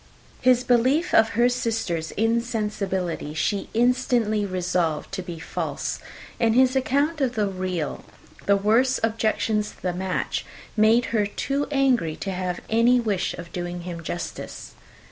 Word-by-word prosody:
His 250 -1 +4
belief 255 +8 +2
of 220 0 +5
her 240 +1 +5
sister's 225 -10 -1
insensibility 210 -8 -1
she 195 +5 -1
instantly 235 -3 +2
resolved 180 -4 -1
to 195 -1 -3
be 175 -2 -7
false; 160 - -3 0.4
and 230 -1 +3
his 255 +1 +4
account 285 +4 +1
of 255 -2 +1
the 210 -2 +2
real, 185 -5 -3 0.4
the 200 0 +5
worst 230 +6 +3
objections 220 -1 +1
to - - -17
the 180 -1 0
match, 185 +1 -2 0.3
made 225 +2 +4
her 210 -3 +2
too 275 +7 -2
angry 260 - +2
to 195 - -4
have 180 -1 -3
any 235 +3 +4
wish 205 -6 -1
of 170 -1 -10
doing 175 0 -4
him 170 -1 -6
justice. 170 +2 -6
215 Hz, 145 wpm, -24 LUFS, 180-245 Hz, 0.4 s, of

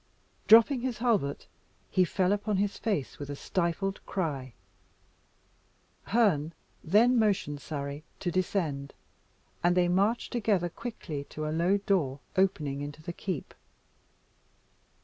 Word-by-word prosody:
Dropping 230 +4 +7
his 250 -2 -2
halbert, 210 - 0 0.5
he 185 - +4
fell 185 +1 +1
upon 205 0 0
his 200 +1 0
face 200 - -2
with 145 -1 -6
a 145 - -4
stifled 185 +5 -2
cry 140 -9 -3 1.5
Herne 175 -9 +2 0.3
then 230 +8 +4
motioned 190 -10 +1
Surrey 140 0 -5 0.2
to 175 - -2
descend, 160 -6 -1 0.7
and 175 +1 +3
they 180 -1 +4
marched 200 +6 +1
together 205 -7 +1
quickly 170 -8 -6
to 155 +1 -6
a 155 - -2
low 175 +5 +3
door 175 -9 0 0.2
opening 155 -7 +1
into 145 +2 -7
the 170 - -5
keep. 180 -5 -5
180 Hz, 125 wpm, -29 LUFS, 150-205 Hz, 1.5 s, Dropping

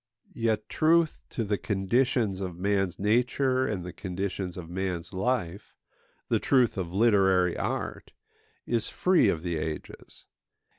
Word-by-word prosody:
Yet 110 -2 -1
truth 165 0 +2
to 115 - -3
the 105 -1 -1
conditions 105 0 0
of 90 -3 -5
man's 95 -1 0
nature 125 +5 +1
and 95 -5 -3
the 90 - -7
conditions 95 0 -4
of 85 -2 -7
man's 90 0 -4
life, 95 -2 -2 0.5
the - - +2
truth 125 -4 +3
of 90 -4 -4
literary 95 -4 +3
art, - - -4 0.5
is 115 -2 -1
free 180 - +3
of 80 -3 -1
the 85 -2 -2
ages. 75 0 -7
100 Hz, 135 wpm, -28 LUFS, 90-115 Hz, 0.5 s, truth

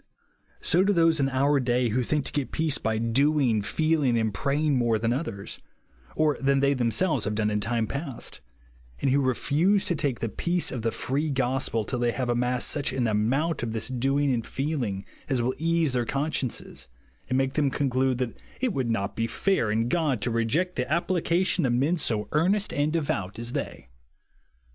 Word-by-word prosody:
So 180 +3 +3
do 205 +1 +3
those 165 -3 +3
in 135 -1 +2
our 140 +2 +2
day 125 -1 +1
who 125 +4 +1
think 145 +3 -1
to - - -1
get 145 -3 -2
peace 155 -3 +1
by 110 0 -1
doing, 125 0 +2
feeling, 150 +1 +1
and 110 -2 0
praying 145 +5 +1
more 120 -3 +2
than 115 +2 0
others, 125 -8 -5 0.6
ct 150 -3 +1
than 135 0 +3
they 140 +1 +3
themselves 130 - +1
have 105 +1 -1
done 105 0 0
in 105 - 0
time 115 +1 0
past; 140 +1 -4 0.6
and 135 - +1
who 140 +2 +3
refuse 155 - +2
to 195 - +1
take 140 -6 -1
the 115 - -1
peace 175 +9 -1
of 125 - -4
the 115 +1 0
free 145 +7 -1
gospel 130 -4 0
till 125 - -2
they 120 -1 +1
have 125 -2 -2
amassed 125 -1 +1
such 145 -2 0
an 130 -2 -1
amount 120 +10 +1
of 115 -2 -3
this 115 - -2
doing 135 +2 +1
and 115 -2 -2
feeling 130 -10 -2 0.2
as 130 -3 +1
will 125 +2 0
ease 165 -3 +1
their 120 -1 0
consciences, 135 - -2 0.4
and 130 - +1
make 135 0 +1
them 145 -2 +2
conclude 130 -1 0
that 125 -3 -3 0.2
it 255 -5 0
would 130 -6 -1
not 100 -3 -1
be 115 0 0
fair 190 - +1
in 115 +2 +1
God 145 -3 +1
to 120 - 0
reject 140 +11 0
the 125 +1 -2
application 175 +1 +1
of 125 -3 +2
men 145 +8 +1
so 110 -7 0
earnest 190 +7 +1
and 145 +1 +1
devout 125 - -2
as 115 +1 -5
they. 65 +1 -5
130 Hz, 195 wpm, -26 LUFS, 115-150 Hz, 0.6 s, So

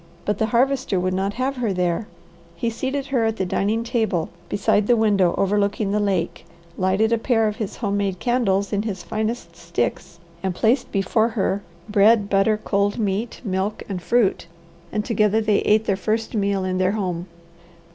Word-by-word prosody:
But 210 -1 -1
the 220 - +2
Harvester 250 -3 +1
would 185 +1 0
not 195 +2 -1
have 260 +2 -1
her 235 -4 0
there. 180 +3 -1 0.5
He 230 +7 -1
seated 265 +4 -3
her 240 -4 +3
at 225 -1 +1
the 190 - 0
dining 210 +5 0
table, 220 -8 0 0.2
beside 205 0 +1
the 245 - +5
window 205 -5 +3
overlooking 200 +1 +1
the 210 - +1
lake, 185 -4 -1 0.3
lighted 195 +5 +2
a 230 - +2
pair 225 -2 +2
of 210 0 -3
his 215 -4 -4
home 205 -3 -1
made 195 -2 -1
candles 200 -4 +1
in 200 - +1
his 195 -5 -4
finest 215 -3 -3
sticks, 170 -2 -3 0.2
and 190 -2 -2
placed 230 +8 +1
before 200 +3 +2
her 195 0 +1 0.3
bread, 210 0 +4
butter, 200 +2 +3
cold 200 -1 0
meat, 215 +1 -2
milk, 195 +1 -2
and 190 -3 -4
fruit, 235 0 +1 0.4
and 210 0 -2
together 215 -1 +2
they 215 -2 +2
ate 215 +1 +3
their 200 - +1
first 220 +4 -2
meal 200 -3 0
in 185 0 -1
their 185 +1 +2
home. 180 -4 -3
205 Hz, 180 wpm, -22 LUFS, 190-225 Hz, 0.5 s, the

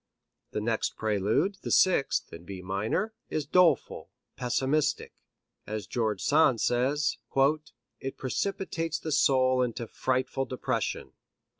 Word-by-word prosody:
The 105 - -3
next 110 0 -1
prelude, 110 - 0
the - - -5
sixth, 180 -7 +3
in 85 - -9
B 95 0 -8
minor, 105 - -1 0.2
is 155 -2 -2
doleful, 165 -3 +2 0.3
pessimistic. 135 +4 0 0.5
As 105 -2 -4
George 110 -5 -1
Sand 145 -5 +4
says: 135 +6 +1 0.8
"It 135 - -5
precipitates 165 +2 -2
the 160 0 -5
soul 130 -2 +3
into 120 -1 -2
frightful 130 +3 -1
depression." 125 -3 -3
130 Hz, 115 wpm, -28 LUFS, 110-155 Hz, 0.8 s, Sand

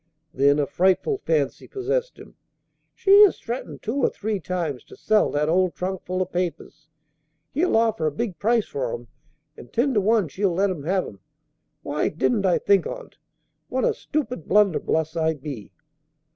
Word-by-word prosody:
Then 140 +2 +3
a 145 - +1
frightful 190 - +1
fancy 155 - -1
possessed 470 +6 -2
him. - - -14 0.6
"She 400 +1 +6
has 405 - +4
threatened 240 +2 -6
two 225 +5 -2
or 275 - +3
three 210 -1 -3
times 170 -9 -3
to - - -14
sell 215 -1 +2
that 150 +1 0
old 180 +2 +2
trunkful 185 0 -2
of 185 - -12
papers. 175 -3 -4 0.6
He'll 320 -2 +2
offer 220 -8 +1
a - - 0
big 180 +1 -4
price 225 0 +2
for 130 -4 -3
'em, 120 -1 -11 0.5
and 120 - -13
ten 260 +4 +1
to 210 - +3
one 215 -2 +2
she'll 185 +3 -1
let 195 +2 +2
him 150 -6 -6
have 185 +2 +1
'em. 100 - -11 0.6
Why 145 +1 -1
didn't 195 +5 0
I 180 - +3
think 200 -2 +2
on't? - - -9 0.5
What - - 0
a 485 - +2
stupid 290 - -4
blunderbuss 170 -5 +2
I 160 -1 +1
be!" 135 -6 -8
185 Hz, 170 wpm, -24 LUFS, 155-230 Hz, 0.6 s, She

